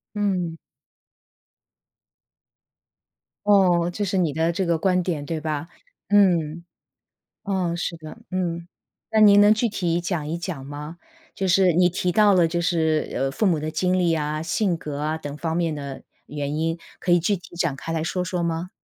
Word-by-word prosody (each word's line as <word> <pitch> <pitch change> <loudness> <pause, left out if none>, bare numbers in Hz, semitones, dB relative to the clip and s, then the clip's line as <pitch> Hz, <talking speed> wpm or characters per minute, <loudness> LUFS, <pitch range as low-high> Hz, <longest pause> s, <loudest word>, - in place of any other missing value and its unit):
嗯。 185 -5 -1 2.9
哦， 180 -4 +4
这 205 +3 -2
是 195 0 -1
你 170 -5 +1
的 160 +3 +1
这 185 +2 -1
个 170 -1 +1
观 180 +2 +2
点 165 -5 -3
对 160 +2 -3
吧？ 155 0 -3 0.4
嗯， 170 -5 +3 0.8
哦， 185 -4 -1
是 170 0 -3
的， 155 +5 -10
嗯。 170 -2 -2 0.4
那 220 - +3
您 205 -1 +7
能 205 +1 +7
具 225 +2 0
体 175 -4 -1
讲 170 -4 -3
一 165 +3 -2
讲 170 -6 -5
吗？ 150 +4 -8 0.4
就 195 - -1
是 185 0 +4
你 180 +2 +4
提 180 0 -1
到 210 +2 +5
了 175 -3 +4
就 170 +1 -2
是， 160 -3 +1
呃， 135 - 0
父 175 +10 -1
母 170 -6 +2
的 155 +1 -3
经 180 +4 0
历 175 -2 +2
啊， 155 -1 -2
性 175 +3 0
格 150 -3 -6
啊， 155 +2 -1
等 145 -2 -6
方 160 +1 -2
面 165 -2 0
的 140 -2 -7 0.2
原 145 0 -4
因， 165 +2 -1 0.2
可 180 - -1
以 175 - +6
具 190 +5 +1
体 175 0 -15
展 170 -5 0
开 135 +5 -6
来 160 -1 -1
说 180 +2 -2
说 180 0 -2
吗？ 170 +1 -2
170 Hz, 190 characters per minute, -23 LUFS, 155-185 Hz, 2.9 s, 您